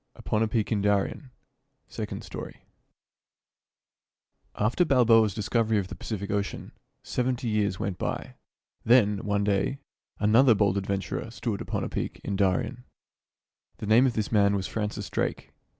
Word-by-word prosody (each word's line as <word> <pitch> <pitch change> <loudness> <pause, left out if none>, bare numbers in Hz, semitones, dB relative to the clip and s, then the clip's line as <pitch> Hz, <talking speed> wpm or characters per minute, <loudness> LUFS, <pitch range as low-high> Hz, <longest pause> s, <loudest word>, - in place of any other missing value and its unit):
"UPON. 105 - -1
A 110 - +3
PEAK 110 0 -1
IN 105 -2 +1
DARIEN 105 +6 0 0.3
" - - -49
SECOND - - -5
STORY - - -9 1.9
After 110 - +2
Balboa's 115 - +4
discovery 110 +1 +1
of 95 -2 -2
the 100 - -6
Pacific 100 +1 -5
Ocean, 100 -1 -3 0.3
seventy 125 0 -1
years 105 -4 0
went 95 -2 -3
by. - - -3 0.5
Then, 105 -4 +4
one 100 0 0
day, 100 +6 0 0.4
another 115 +4 +5
bold 100 -2 +2
adventurer 100 +3 -3
stood 110 -3 -4
upon - - -3
a - - -2
peak - - -4
in 100 - -2
Darien. 100 +6 0 0.9
The - - -6
name 115 +5 +5
of 125 - 0
this 110 -2 -2
man 100 -2 +4
was 95 -1 -2
Francis 105 -1 -3
Drake. - - -3
105 Hz, 150 wpm, -27 LUFS, 100-115 Hz, 1.9 s, another